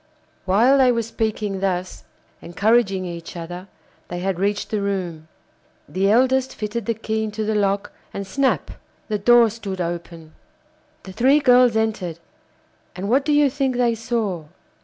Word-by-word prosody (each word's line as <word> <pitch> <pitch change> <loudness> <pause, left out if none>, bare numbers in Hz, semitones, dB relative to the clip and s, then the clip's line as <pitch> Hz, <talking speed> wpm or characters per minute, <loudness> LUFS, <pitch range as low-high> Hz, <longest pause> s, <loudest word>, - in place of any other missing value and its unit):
While 235 +9 +4
they 255 -2 +5
were 230 -1 0
speaking 215 -3 -2
thus, 185 -1 -3 0.4
encouraging 195 +1 +1
each 170 0 -7
other, 175 +3 -7 0.4
they 175 - -5
had 185 0 -2
reached 205 +1 -1
the 210 -2 0
room; 180 -6 -3 0.6
the 195 +2 0
eldest 260 +3 +2
fitted 220 +2 -4
the 230 - 0
key 220 0 -2
into 215 0 -3
the 220 - 0
lock, 200 -1 0 0.2
and 200 - -5
snap! 265 +8 0 0.4
the 210 -1 -1
door 240 +3 +6
stood 200 -4 -6
open. 170 -2 -5 0.7
The 190 - -10
three 265 +8 +4
girls 250 -4 +5
entered, 210 -7 -1 0.8
and 190 +3 -4
what 265 +4 +3
do 300 - 0
you 295 0 +5
think 270 -1 -1
they 240 -1 +2
saw? 220 -7 -2
210 Hz, 155 wpm, -22 LUFS, 185-240 Hz, 0.8 s, door